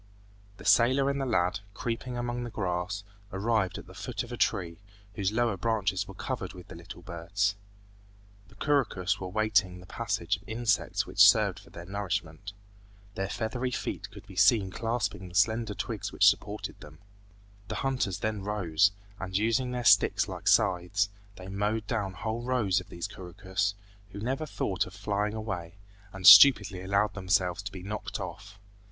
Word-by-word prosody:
The - - -13
sailor 130 +4 +4
and 140 0 -3
the 135 - -2
lad, 90 -6 +1 0.2
creeping 120 +3 -4
among 120 0 -3
the 120 - -5
grass, 95 -1 -3 0.3
arrived 100 -1 0
at - - -9
the - - -14
foot - - -4
of - - -11
a - - -3
tree, 85 -2 -1 0.3
whose 100 -2 -1
lower 115 -2 +1
branches 105 -2 0
were 95 - -10
covered 110 -4 -4
with 90 -1 -13
little 85 +1 -10
birds. 95 +4 -1 0.9
The 105 - -19
couroucous 100 -8 0
were 95 - -5
waiting 100 -2 +1
the 90 - -13
passage 90 +1 -2
of 95 - -20
insects 115 -1 0
which - - -9
served - - +2
for - - -17
their 85 - -10
nourishment. 95 -2 -4 0.6
Their 95 0 -3
feathery 120 +4 -2
feet 125 - -4
could - - -13
be 100 -3 -13
seen 95 +1 +4
clasping 105 -4 -2
the 85 - -13
slender 110 0 +2
twigs - - -4
which - - +3
supported - - +1
them. 75 +1 -12 0.7
The 110 - -4
hunters 125 -9 -1
then 110 -2 -2
rose, 100 -2 +2 0.3
and 95 0 -2
using 115 +4 +1
their 125 -1 -4
sticks 105 -4 +5
like - - -7
scythes, 95 +2 +3 0.3
they 95 - -10
mowed 105 +3 -1
down 100 -4 -2
whole 110 +5 -4
rows 120 -6 +1
of 90 - -11
these 85 - -5
couroucous, 95 +3 -3 0.4
who 100 - -6
never 135 +8 -2
thought 95 -10 -2
of 90 - -12
flying 105 +1 -2
away, 95 -6 -5 0.4
and 95 -1 -7
stupidly 105 -2 +9
allowed 100 +2 +1
themselves 95 -1 0
to 100 0 -6
be 95 -2 -9
knocked 105 +2 -5
off. 100 +1 -8
100 Hz, 170 wpm, -29 LUFS, 95-110 Hz, 0.9 s, stupidly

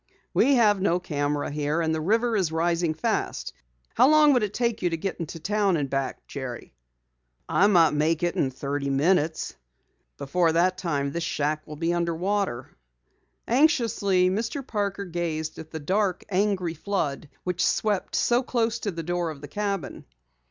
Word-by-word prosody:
"We 275 +2 +4
have 210 -5 +4
no 180 -2 +2
camera 145 -4 -2
here, 150 +2 -1
and 160 -1 0
the 160 - -1
river 225 +7 +1
is 185 -6 +1
rising 165 0 0
fast. 160 - -2 0.4
How 250 +4 +5
long 305 -1 +6
would 250 - +3
it 210 -2 -1
take 235 0 -1
you 180 - +2
to 165 - -2
get 170 -1 -4
to 165 - -8
town 200 +1 +1
and 140 -3 -3
back, 135 -2 -2
Jerry?" 130 - -7 0.7
"I 200 - +4
might 170 -6 +5
make 155 +3 +1
it 175 - 0
in 135 - +1
thirty 140 +2 -3
minutes." 160 +3 +1 0.6
"Before 165 +4 +1
that 185 +2 +2
time, 145 -6 -1
this 170 - -3
shack 150 -1 -2
will 150 - -7
be 165 +3 0
under 170 -1 0
water." 185 -8 -2 0.8
Anxiously, 230 - +3
Mr. 235 +7 -3
Parker 200 -4 -2
gazed 165 -3 -3
at 160 - -9
the 160 - -6
dark, 185 +4 0
angry 190 -3 0
flood 160 -5 -3
which 180 -1 -1
swept 210 -3 0
so 240 +1 +3
close 235 -3 -1
to 210 - -2
the 165 -3 -5
door 175 0 -1
of 155 -3 -7
the 145 - -8
cabin. 200 -1 -4
175 Hz, 175 wpm, -26 LUFS, 155-205 Hz, 0.8 s, long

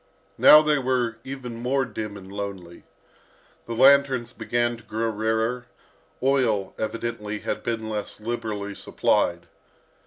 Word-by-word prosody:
Now 155 0 +9
they 150 -2 +2
were 125 -3 0
even 130 -3 -7
more 130 +2 +1
dim 110 -4 -6
and 95 -1 -12
lonely. 100 -4 -7 0.8
The 115 - -4
lanterns 130 -2 +4
began 120 0 -1
to 115 - -17
grow 110 +2 -2
rarer, 110 +3 -1 0.6
oil, 125 -7 +1
evidently, 110 -2 -4
had - - -3
been 115 -2 -3
less 105 -1 -5
liberally 105 -3 -4
supplied. - - 0
115 Hz, 125 wpm, -25 LUFS, 105-125 Hz, 0.8 s, Now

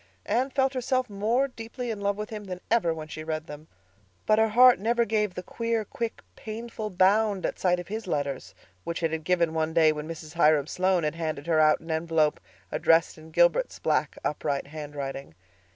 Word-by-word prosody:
Anne 260 +3 +1
felt 270 0 +1
herself 255 -2 -1
more 225 +7 +1
deeply 240 0 -6
in 210 -2 -5
love 200 0 0
with 210 +1 -5
him 210 -1 -6
than 180 -2 -6
ever 225 -8 +3
when 160 -1 -5
she 155 0 -7
read 155 0 -3
them; 150 0 -10 0.6
but 215 0 +4
her 220 - +4
heart 250 +1 +7
never 235 +3 +1
gave 210 -3 0
the 180 - -5
queer, 230 +1 -2
quick, 230 +2 -5
painful 220 0 -6
bound 200 +1 +2
at - - -3
sight 180 -1 +2
of 175 - -7
his 220 0 -5
letters 140 -5 -3 0.3
which 170 0 -4
it 165 - +1
had 160 -1 -3
given 170 -1 +1
one 160 0 -1
day 160 -2 +6
when 150 0 -5
Mrs. 160 -1 -8
Hiram 155 -4 +4
Sloane 185 +1 +1
had 150 - 0
handed 155 -3 -4
her 165 -2 +2
out 155 -1 +4
an 165 0 -7
envelope 160 -1 +1 0.3
addressed 165 0 +2
in 155 +1 -13
Gilbert's 175 - +2
black, - - 0
upright 145 -1 -1
handwriting. 140 - -7
175 Hz, 200 wpm, -27 LUFS, 155-220 Hz, 0.6 s, heart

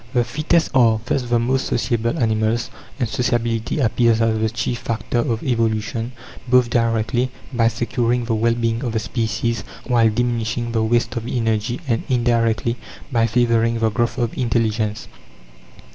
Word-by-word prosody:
The 120 - +4
fittest 155 +6 +1
are 115 -4 +4
thus 130 - 0
the 120 -1 0
most 130 +3 0
sociable 115 -1 0
animals, 110 0 0 0.3
and 120 - +1
sociability 120 -1 -1
appears 115 -3 +2
as 115 -1 +2
the 110 0 +1
chief 120 +2 -2
factor 120 0 -2
of 115 -1 -1
evolution, 115 -1 -1 0.3
both 125 -1 +4
directly, 115 +2 +1 0.2
by 115 -2 +3
securing 120 +1 0
the 115 - -1
well 115 +1 +2
being 115 0 -1
of 120 -3 -2
the 110 - +1
species 115 0 -2 0.2
while 120 -3 +3
diminishing 120 +1 -1
the 115 -1 +1
waste 120 +2 +1
of 115 0 -4
energy, 115 0 -1
and 115 -3 +1
indirectly, 115 -1 +1 0.3
by 115 -2 +2
favouring 115 0 +2
the 115 -1 +1
growth 120 +3 -1
of 120 -2 -1
intelligence. 110 -3 -1
115 Hz, 155 wpm, -21 LUFS, 115-120 Hz, 0.3 s, The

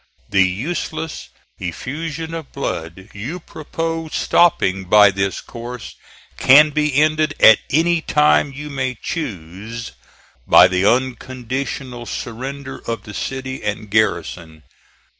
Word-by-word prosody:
The 100 -1 +4
useless 155 - -4 0.3
effusion 155 - -5
of 160 -4 -7
blood 95 -6 -5
you 125 - -5
propose 165 0 -5
stopping 95 - +2
by 105 +2 +6
this 95 0 -2
course 120 0 -8 0.5
can 150 +3 +7
be 150 -1 0
ended 155 -1 +2
at 110 -1 +8
any 165 +3 +2
time 150 -2 +3
you 150 +2 -8
may 130 -2 -2
choose, 110 - -6 0.6
by - - +8
the 95 +1 +1
unconditional 130 0 -2
surrender 135 +4 -6
of 115 0 -3
the 105 - -10
city 130 +3 -4
and 105 0 -4
garrison. 85 -6 -1
130 Hz, 115 wpm, -19 LUFS, 105-150 Hz, 0.6 s, at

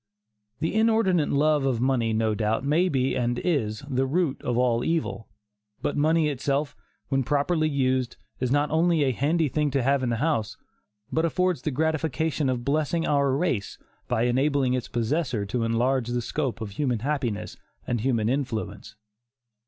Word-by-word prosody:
The 160 - 0
inordinate 220 -7 +3
love 150 0 +2
of 130 -4 0
money, 125 -3 +1
no 110 0 +1
doubt, 110 +4 -1
may 165 +6 +2
be 130 -3 0
and 120 -1 0
is 120 -10 -1
"the 135 -1 0
root 155 -1 0
of 120 -1 -1
all 120 -1 +2
evil," 160 -8 -2 0.6
but - - -1
money 155 +2 +3
itself, 140 +1 -1 0.3
when 135 -1 +2
properly 155 +4 +1
used, 130 -3 0 0.2
is 125 - 0
not 145 +1 +2
only 165 -1 +3
a 135 - +2
"handy 150 +6 +1
thing 150 +2 0
to 135 -2 0
have 135 +1 +2
in 125 - -1
the 115 - 0
house," 120 -4 -1 0.5
but 160 - +1
affords 180 -2 +1
the 155 - -1
gratification 155 0 0
of 120 -2 -2
blessing 155 +3 0
our 140 -2 +2
race 130 - -1 0.3
by 120 -2 +1
enabling 130 +1 +2
its 125 -2 -2
possessor 120 -2 -1
to 115 +4 -2
enlarge 120 +2 +1
the 120 0 -2
scope 130 -3 -3
of 105 -2 -5
human 125 0 -1
happiness 130 -6 -2 0.3
and 120 -3 -1
human 115 -3 +1
influence. 110 -6 -3
135 Hz, 170 wpm, -26 LUFS, 120-155 Hz, 0.6 s, inordinate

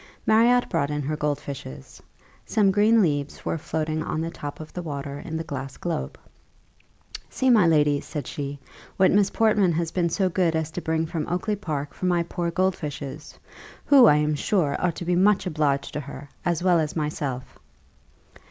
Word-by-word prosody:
Marriott 235 +3 +4
brought 140 - 0
in 150 0 -2
her 155 +3 -2
gold 150 -1 -1
fishes; 65 - -9 0.4
some 205 -3 +2
green 210 +2 +4
leaves 145 -4 -2
were 165 - -1
floating 155 0 -2
on 155 - -3
the 165 +1 -3
top 145 -3 -7
of 155 0 -10
the 180 - -4
water 140 -3 -5
in 160 +2 -5
the 160 - -3
glass 135 -3 -6
globe. 170 -3 -4 1.1
"See, 260 -1 +1
my 210 -7 +5
lady," 150 -3 +3
said 150 -4 -6
she, 140 +1 -5 0.4
"what 190 - +5
Miss 200 -1 +3
Portman 210 -5 +3
has 165 0 -1
been 175 -2 0
so 190 +3 +1
good 180 -2 +1
as 160 -1 -2
to 175 - -5
bring 160 0 0
from 160 -2 -4
Oakly 180 +5 -1
park 150 -8 -4
for 185 - -3
my 175 -1 +2
poor 170 0 -3
gold 185 +2 +1
fishes, 145 -1 -7 0.5
who, 270 -5 +7
I 150 - +6
am 150 0 +1
sure, 150 -1 0
ought 175 -3 0
to 175 - -6
be 175 +1 +1
much 195 +2 +3
obliged 150 -5 0
to - - -2
her, 145 0 -9
as 175 -2 0
well 180 -2 +4
as 155 -1 -2
myself." 145 -5 -4
160 Hz, 190 wpm, -25 LUFS, 145-185 Hz, 1.1 s, who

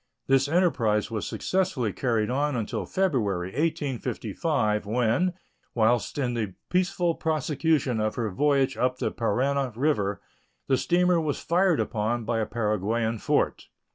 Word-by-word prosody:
This 135 0 +3
enterprise 120 - +1
was 110 -3 -3
successfully 180 - -1
carried 115 -3 0
on 145 +2 0
until 115 -3 -3
February, 105 - 0
1855, 130 - -1
when, 125 - +1 0.4
whilst 120 +3 +2
in 125 -4 0
the 110 -6 -3 0.2
peaceful 180 -2 +1
prosecution 150 -5 0
of 110 0 -1
her 115 -4 -2
voyage 140 +5 +2
up 125 0 0
the - - -1
Parana 130 +4 0
River, 110 -7 0 0.5
the 135 - +2
steamer 180 +1 +2
was 150 -3 -2
fired 180 -1 +2
upon 115 +2 -1
by 115 0 0
a 110 - -1
Paraguayan 110 +1 -1
fort. - - 0
125 Hz, 135 wpm, -26 LUFS, 110-155 Hz, 0.5 s, This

